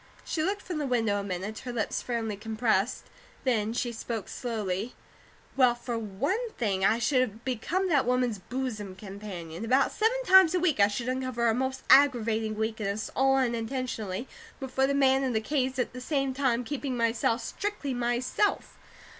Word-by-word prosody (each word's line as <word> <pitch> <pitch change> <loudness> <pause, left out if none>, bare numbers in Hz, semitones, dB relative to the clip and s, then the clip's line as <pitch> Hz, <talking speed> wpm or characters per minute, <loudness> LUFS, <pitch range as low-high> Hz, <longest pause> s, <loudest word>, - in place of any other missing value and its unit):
She 315 - -2
looked 395 +5 -1
from 350 -4 -4
the 290 - -1
window 225 -5 +1
a - - -4
minute, 195 +3 -4
her 250 - -6
lips 230 -3 -2
firmly 230 -3 -2
compressed. 220 0 0 0.4
Then 220 -4 +1
she 240 +1 -1
spoke 225 -2 -5
slowly: 215 -3 -3 0.6
"Well, 250 -3 +5
for 240 0 -5
one 265 - -2
thing, 195 -5 0
I 215 +3 +4
should 240 -3 0
become 300 - -1
that 285 -7 +3
woman's 250 -4 +1
bosom 215 -5 -4
companion. 190 -3 -7
About 255 +4 +3
seven 480 +3 +1
times 375 -3 +7
a - - +3
week 330 -9 +1
I 200 - +7
should 235 +4 -4
uncover 255 -2 -1
her 225 - +4
most 260 +2 -2
aggravating 225 -6 +4
weakness 215 -1 -2
all 270 0 +4
unintentionally 235 -3 -2 0.3
before 265 -1 0
the 280 - 0
man 270 -1 +4
in 260 -2 0
the 220 - +2
case, 260 +2 -1
at 250 - -1
the 255 - -7
same 275 0 0
time 255 -3 +1
keeping 270 0 -3
myself, 230 0 +1
strictly 395 - -3
myself. 245 +11 -1
245 Hz, 170 wpm, -28 LUFS, 220-265 Hz, 0.6 s, times